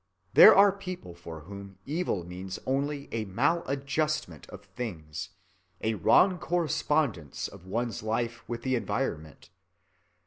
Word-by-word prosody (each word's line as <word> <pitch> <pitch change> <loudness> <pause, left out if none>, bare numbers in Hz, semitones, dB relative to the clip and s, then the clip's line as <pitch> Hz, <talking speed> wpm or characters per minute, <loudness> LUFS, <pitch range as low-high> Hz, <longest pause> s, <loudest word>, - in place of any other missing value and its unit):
There - - +10
are 200 0 +7
people 185 - -7
for 85 -2 -9
whom 100 +3 -10
evil 150 - -1
means 90 +2 -6
only 140 +2 -1
a 110 -1 -1
mal‐adjustment 140 - -1
with - - -11
things, 95 - -6 0.5
a 110 - 0
wrong 180 - +4
correspondence 150 - 0
of 90 - -14
one's 115 +2 -2
life 115 +2 -2
with 120 -1 -4
the 130 - 0
environment. 85 - -3
120 Hz, 125 wpm, -29 LUFS, 95-150 Hz, 0.5 s, There